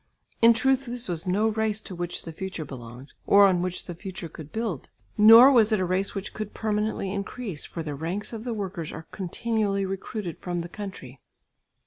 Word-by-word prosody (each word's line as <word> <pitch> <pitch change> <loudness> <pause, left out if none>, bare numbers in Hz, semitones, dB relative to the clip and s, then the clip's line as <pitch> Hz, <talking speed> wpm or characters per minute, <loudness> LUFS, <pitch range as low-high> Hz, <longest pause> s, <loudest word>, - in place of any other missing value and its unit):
In 230 0 +8
truth 265 +3 +1
this 240 0 -4
was 170 -1 -3
no 205 +5 +2
race 220 -1 0
to 195 - -8
which 175 0 -4
the 165 - -7
future 185 -2 -5
belonged, 125 0 -10
or 200 0 +7
on 185 -3 +3
which 180 0 -2
the 175 - -6
future 180 0 -7
could 155 -1 -11
build; 220 - -3 0.3
nor 225 +5 +9
was 225 -4 +5
it 215 - +3
a 185 - +1
race 185 +3 -1
which 195 +1 -5
could 215 -1 -6
permanently 210 -2 -1
increase, 200 -3 -4
for 165 - -6
the 150 -2 -4
ranks 170 +10 -4
of 220 -1 -6
the 245 - -3
workers 190 -6 -4
are 160 - -8
continually 200 +1 -1
recruited 190 -1 -5
from 175 -1 -3
the 170 - -7
country. 175 -11 -8
195 Hz, 195 wpm, -26 LUFS, 175-220 Hz, 0.3 s, nor